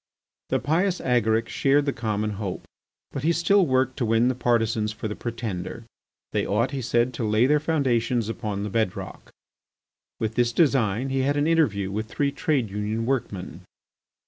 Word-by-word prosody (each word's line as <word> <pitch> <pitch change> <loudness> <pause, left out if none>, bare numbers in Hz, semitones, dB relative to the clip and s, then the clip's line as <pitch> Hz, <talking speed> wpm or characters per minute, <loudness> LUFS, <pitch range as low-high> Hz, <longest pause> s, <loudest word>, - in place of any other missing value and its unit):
The - - +2
pious 180 +5 +1
Agaric 115 -2 +1
shared 140 +1 +2
the 140 - 0
common 110 -2 -2
hope. 100 -2 -4 0.5
But 135 - -4
he 160 +4 +2
still 175 +2 +3
worked 130 -1 +1
to 120 - 0
win 115 +3 +3
partisans 115 -3 +1
for 110 0 -5
the 105 - -4
Pretender. 115 -2 -5 0.5
They - - 0
ought, 115 +6 0
he 135 -2 -3
said, 120 +1 +1
to 120 - -4
lay 110 +2 +3
their 150 +3 +4
foundations 125 -7 +1
upon 105 -3 -3
the 105 - -4
bed 110 -4 0
rock. - - -8 0.9
With 110 -1 -2
this 120 0 +1
design 130 - +2
he 135 0 0
had 140 +2 +1
an 145 - +2
interview 115 -13 +2
with 110 +2 -3
three 140 +4 -1
Trade 135 -8 0
Union 105 +3 -2
workmen. 95 - -3
120 Hz, 170 wpm, -25 LUFS, 110-135 Hz, 0.9 s, their